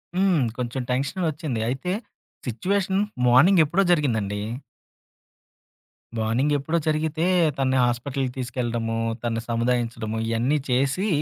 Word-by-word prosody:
హ్మ్. 185 Hz, -7 st, +3 dB
కొంచెం 125 Hz, +1 st, -3 dB
టెన్షన్ 140 Hz, +8 st, -1 dB
వచ్చింది. 145 Hz, -7 st, -3 dB
అయితే, 135 Hz, +8 st, -2 dB, 0.5 s
సిట్యుయేషన్ 190 Hz, -, 0 dB, 0.3 s
మార్నింగెప్పుడో 165 Hz, +7 st, +5 dB
జరిగిందండి. 110 Hz, -, +1 dB, 1.8 s
మార్నింగెప్పుడో 140 Hz, +8 st, +1 dB
జరిగితే 155 Hz, +1 st, 0 dB, 0.3 s
తనని 130 Hz, -1 st, +1 dB
హాస్పిటల్‌కి 125 Hz, +2 st, -1 dB
తీసుకెళ్ళడము, 120 Hz, -2 st, -2 dB, 0.3 s
తనను 115 Hz, -1 st, -1 dB
సముదాయించడము 115 Hz, -2 st, -1 dB
ఇయన్నీ 120 Hz, +6 st, +1 dB
చేసి 135 Hz, +11 st, +1 dB
130 Hz, 90 wpm, -24 LUFS, 120-160 Hz, 1.8 s, మార్నింగెప్పుడో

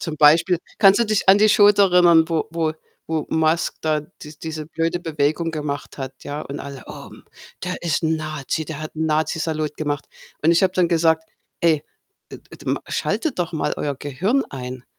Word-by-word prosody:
Zum 160 Hz, -3 st, -4 dB
Beispiel, 165 Hz, +4 st, +5 dB, 0.2 s
kannst 195 Hz, 0 st, +6 dB
du 235 Hz, -, +4 dB
dich 215 Hz, -3 st, -1 dB
an 195 Hz, -, +8 dB
die 215 Hz, +1 st, +5 dB
Show 205 Hz, 0 st, +7 dB
da 200 Hz, -1 st, +4 dB
erinnern, 175 Hz, -3 st, +5 dB
wo 165 Hz, -2 st, 0 dB
wo 165 Hz, -1 st, -1 dB, 0.4 s
wo 160 Hz, -2 st, -2 dB
Musk 160 Hz, 0 st, +1 dB
da 155 Hz, -1 st, 0 dB, 0.2 s
dies 150 Hz, 0 st, -11 dB
diese 160 Hz, -1 st, -5 dB
blöde 165 Hz, +2 st, -2 dB
Bewegung 155 Hz, +1 st, -1 dB
gemacht 145 Hz, -3 st, -5 dB
hat, 135 Hz, 0 st, -5 dB
ja? 145 Hz, +1 st, -5 dB
Und 140 Hz, +1 st, -7 dB
alle: 140 Hz, -1 st, -8 dB
„Oh, -, -, -9 dB
hm, -, -, -15 dB, 0.4 s
der 180 Hz, 0 st, -4 dB
ist 170 Hz, -1 st, 0 dB
'n 160 Hz, 0 st, +1 dB
Nazi, 155 Hz, 0 st, -3 dB
der 155 Hz, -1 st, -7 dB
hat 155 Hz, -, -7 dB
'n 160 Hz, 0 st, -1 dB
Nazi-Salut 155 Hz, -1 st, -1 dB
gemacht.“ 145 Hz, -2 st, -3 dB, 0.4 s
Und 160 Hz, -, +4 dB
ich 170 Hz, -, +3 dB
habe 185 Hz, -, +3 dB
dann 180 Hz, -2 st, +2 dB
gesagt: 160 Hz, -1 st, +2 dB, 0.4 s
„Ey, 160 Hz, -3 st, +3 dB, 0.5 s
et -, -, -10 dB
et -, -, -13 dB
ma -, -, 0 dB
schaltet 320 Hz, -, -2 dB
doch 175 Hz, 0 st, -1 dB
mal 155 Hz, -, -1 dB
euer 145 Hz, -1 st, -2 dB
Gehirn 180 Hz, -, 0 dB
ein. 125 Hz, -1 st, -7 dB
160 Hz, 200 wpm, -21 LUFS, 150-170 Hz, 0.5 s, an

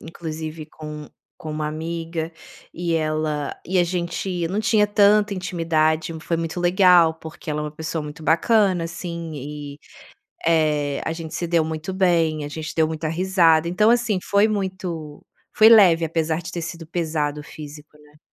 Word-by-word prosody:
inclusive, 160 Hz, -1 st, -7 dB
com 150 Hz, -1 st, -9 dB, 0.3 s
com 155 Hz, -, -7 dB
uma 150 Hz, 0 st, -3 dB
amiga, 165 Hz, +1 st, -4 dB, 0.4 s
e 170 Hz, -1 st, -2 dB
ela 155 Hz, -2 st, -1 dB
e 185 Hz, -, -1 dB
a 180 Hz, -, +5 dB
gente 175 Hz, 0 st, -2 dB
não 195 Hz, +5 st, -1 dB
tinha 215 Hz, -1 st, +3 dB
tanta 205 Hz, 0 st, +4 dB
intimidade, 165 Hz, -3 st, 0 dB
foi 165 Hz, +1 st, -2 dB
muito 165 Hz, +1 st, -3 dB
legal 175 Hz, -2 st, +5 dB
porque 160 Hz, 0 st, -9 dB
ela 150 Hz, -, -2 dB
é -, -, -3 dB
uma 150 Hz, -, -4 dB
pessoa 160 Hz, +1 st, -4 dB
muito 150 Hz, +2 st, -9 dB
bacana, 185 Hz, +2 st, +3 dB
assim, 170 Hz, -1 st, -6 dB
e 145 Hz, 0 st, -7 dB, 0.7 s
Eh, 150 Hz, -3 st, +1 dB
a -, -, -1 dB
gente 165 Hz, -1 st, -7 dB
se 175 Hz, -, -2 dB
deu 165 Hz, -1 st, +2 dB
muito 160 Hz, +3 st, -4 dB
bem, 165 Hz, -5 st, +2 dB
a -, -, -4 dB
gente 155 Hz, +1 st, -6 dB
deu 160 Hz, -1 st, +2 dB
muita 160 Hz, 0 st, -4 dB
risada. 170 Hz, -2 st, +3 dB
Então, 210 Hz, +6 st, +3 dB
assim, 235 Hz, -4 st, +1 dB
foi 200 Hz, +2 st, +3 dB
muito 185 Hz, -7 st, -4 dB, 0.3 s
foi 215 Hz, -, +7 dB
leve 180 Hz, -7 st, +6 dB
apesar 160 Hz, 0 st, -1 dB
de 175 Hz, -, -7 dB
ter 170 Hz, -, -4 dB
sido 165 Hz, 0 st, -7 dB
pesado 155 Hz, -3 st, -2 dB
o -, -, -13 dB
físico, 150 Hz, 0 st, -11 dB
né? 150 Hz, 0 st, -22 dB
165 Hz, 170 wpm, -22 LUFS, 155-180 Hz, 0.7 s, foi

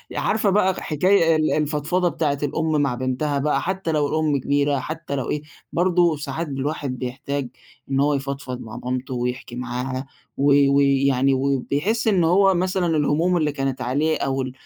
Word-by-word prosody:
عارفة 215 Hz, -2 st, +1 dB
بقى 190 Hz, -1 st, +3 dB
حكاية 165 Hz, +1 st, +3 dB
ال 155 Hz, 0 st, +1 dB
الفضفضة 155 Hz, +4 st, 0 dB
بتاعة 145 Hz, -4 st, -1 dB
الأم 155 Hz, +1 st, 0 dB
مع 130 Hz, -4 st, 0 dB
بنتها 130 Hz, +3 st, -1 dB
بقى، 150 Hz, +2 st, +1 dB
حتى 190 Hz, -2 st, -2 dB
لو 150 Hz, -2 st, +1 dB
الأم 155 Hz, -2 st, +1 dB
كبيرة، 140 Hz, +1 st, +1 dB
حتى 155 Hz, 0 st, -5 dB
لو 130 Hz, -, -3 dB
إيه، 150 Hz, -, -1 dB, 0.3 s
برضه 175 Hz, -2 st, +3 dB
ساعات 150 Hz, +3 st, -4 dB
الواحد 135 Hz, -1 st, -3 dB
بيحتاج 135 Hz, +2 st, -4 dB, 0.4 s
إن 135 Hz, -, +1 dB
هو 145 Hz, +1 st, +3 dB
يفضفض 135 Hz, -2 st, -4 dB
مع 110 Hz, -, -8 dB
مامته، 130 Hz, +1 st, -3 dB
ويحكي 125 Hz, 0 st, -3 dB
معاها، 125 Hz, +2 st, -4 dB, 0.3 s
و 140 Hz, +1 st, +3 dB, 0.2 s
و 140 Hz, -, +5 dB
يعني 135 Hz, -1 st, +3 dB
وبيحس 140 Hz, -, 0 dB
إن 190 Hz, -5 st, +3 dB
هو 195 Hz, +3 st, +4 dB
مثلًا 185 Hz, 0 st, 0 dB
الهموم 160 Hz, +5 st, +2 dB
اللي 150 Hz, -2 st, +1 dB
كانت 135 Hz, -2 st, -3 dB
عليه، 145 Hz, +6 st, 0 dB
أو 135 Hz, 0 st, -1 dB
ال 130 Hz, -1 st, -4 dB
145 Hz, 170 wpm, -22 LUFS, 135-165 Hz, 0.4 s, و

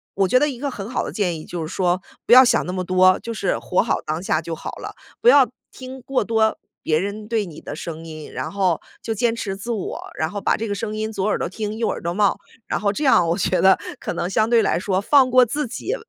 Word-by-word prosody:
我 195 Hz, -1 st, +2 dB
觉 255 Hz, -, +4 dB
得 295 Hz, +3 st, +3 dB
一 245 Hz, -3 st, -7 dB
个 285 Hz, -, -2 dB
很 205 Hz, -5 st, -7 dB
好 255 Hz, -, -2 dB
的 -, -, -6 dB
建 180 Hz, -6 st, -1 dB
议 155 Hz, -, -10 dB
就 175 Hz, -2 st, -5 dB
是 -, -, -7 dB
说， 180 Hz, 0 st, +1 dB, 0.2 s
不 -, -, +5 dB
要 255 Hz, +1 st, +10 dB
想 245 Hz, -, +2 dB
那 180 Hz, -, -4 dB
么 185 Hz, -, -2 dB
多， 185 Hz, +1 st, +4 dB
就 230 Hz, -, -5 dB
是 195 Hz, -4 st, -1 dB
活 180 Hz, -, +1 dB
好 230 Hz, -, -1 dB
当 155 Hz, +2 st, -2 dB
下 160 Hz, -4 st, 0 dB
就 165 Hz, 0 st, -6 dB
好 160 Hz, -, -6 dB
了。 -, -, -8 dB, 0.3 s
不 475 Hz, -, +6 dB
要 280 Hz, -, +6 dB, 0.2 s
听 260 Hz, 0 st, -9 dB
过 265 Hz, +1 st, -1 dB
多 220 Hz, -1 st, +1 dB, 0.2 s
别 155 Hz, 0 st, +2 dB
人 205 Hz, +2 st, -5 dB
对 225 Hz, -3 st, 0 dB
你 165 Hz, -4 st, -11 dB
的 145 Hz, -, -7 dB
声 165 Hz, 0 st, -7 dB
音， 155 Hz, -2 st, -9 dB
然 -, -, -4 dB
后 190 Hz, -5 st, 0 dB, 0.2 s
就 225 Hz, -, -3 dB
坚 230 Hz, +2 st, +1 dB
持 210 Hz, -4 st, -4 dB
自 200 Hz, +5 st, -5 dB
我， 215 Hz, -5 st, -5 dB
然 160 Hz, -, -1 dB
后 205 Hz, +2 st, -5 dB
把 -, -, +1 dB
这 225 Hz, -, -3 dB
个 205 Hz, -, -2 dB
声 210 Hz, +1 st, -4 dB
音 220 Hz, 0 st, -3 dB
左 195 Hz, -2 st, -2 dB
耳 210 Hz, -, +1 dB
朵 -, -, -1 dB
听， 210 Hz, +3 st, -5 dB
右 230 Hz, -, 0 dB
耳 -, -, -3 dB
朵 170 Hz, +1 st, -2 dB
冒。 205 Hz, +1 st, +2 dB, 0.3 s
然 -, -, -1 dB
后 200 Hz, -1 st, +2 dB
这 290 Hz, +9 st, -3 dB
样 260 Hz, -, +5 dB
我 170 Hz, -, +1 dB
觉 185 Hz, -1 st, +1 dB
得 190 Hz, 0 st, +5 dB, 0.2 s
可 -, -, -3 dB
能 175 Hz, +1 st, -2 dB
相 215 Hz, +4 st, +1 dB
对 235 Hz, -2 st, +5 dB
来 195 Hz, -, +1 dB
说 185 Hz, +1 st, 0 dB
放 260 Hz, +4 st, +4 dB
过 255 Hz, 0 st, +6 dB
自 290 Hz, +6 st, -2 dB
己， 320 Hz, -, -4 dB
205 Hz, 295 characters per minute, -21 LUFS, 180-235 Hz, 0.3 s, 要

